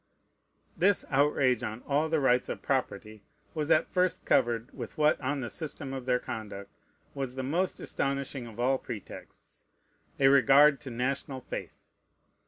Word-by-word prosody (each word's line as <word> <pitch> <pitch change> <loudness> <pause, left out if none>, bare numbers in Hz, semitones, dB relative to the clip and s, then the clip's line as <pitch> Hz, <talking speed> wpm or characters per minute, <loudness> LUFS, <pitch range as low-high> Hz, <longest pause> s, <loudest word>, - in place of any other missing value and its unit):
This 200 +2 +2
outrage 135 -3 +3
on 110 0 -5
all 150 +3 0
the 160 -1 +2
rights 125 -3 +2
of - - -5
property 110 -5 -2 0.3
was 155 -1 -2
at 155 - +4
first 180 -1 0
covered 115 +1 +1
with - - -8
what, 150 0 +3
on 140 +1 -2
the 120 - -3
system 145 -3 -4
of 130 -1 -6
their 125 -1 +3
conduct, 100 -4 -7 0.4
was 135 -2 -4
the 130 - -3
most 170 +8 -1
astonishing 140 -2 -3
of 115 0 -12
all 130 +2 +2
pretexts, 110 -6 -10 0.6
a 135 - +5
regard 140 +2 +6
to 140 - -7
national 130 +2 -3
faith. - - -8
135 Hz, 155 wpm, -29 LUFS, 125-145 Hz, 0.6 s, regard